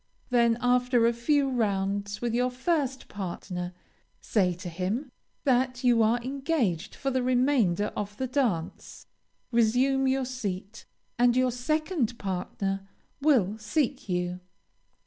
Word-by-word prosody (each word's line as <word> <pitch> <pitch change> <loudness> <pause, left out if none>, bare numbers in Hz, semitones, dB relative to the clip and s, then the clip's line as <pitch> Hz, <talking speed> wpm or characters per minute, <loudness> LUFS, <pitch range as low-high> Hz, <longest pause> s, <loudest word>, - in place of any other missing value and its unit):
Then, 235 -2 +4
after 245 -1 +3
a 235 - +3
few 275 +4 +2
rounds 205 -4 -1
with 235 -1 0
your 250 +1 +2
first 265 0 -1
partner, 180 -2 -5 0.5
say 185 -5 +1
to 180 +2 -8
him 190 - -3 0.3
that 255 -1 +1
you 240 -2 +4
are 225 +2 +3
engaged 260 - -1
for 275 - -2
the 260 0 +1
remainder 245 -7 +2
of 205 0 -4
the 260 - -1
dance, 240 - -2 0.5
resume 250 +4 +3
your 265 0 +1
seat, 210 -5 -5 0.3
and 245 0 +4
your 255 0 +3
second 265 - -1
partner 195 0 -3 0.3
will 225 -9 +3
seek 255 +2 -1
you. 180 0 -1
240 Hz, 125 wpm, -28 LUFS, 200-260 Hz, 0.5 s, Then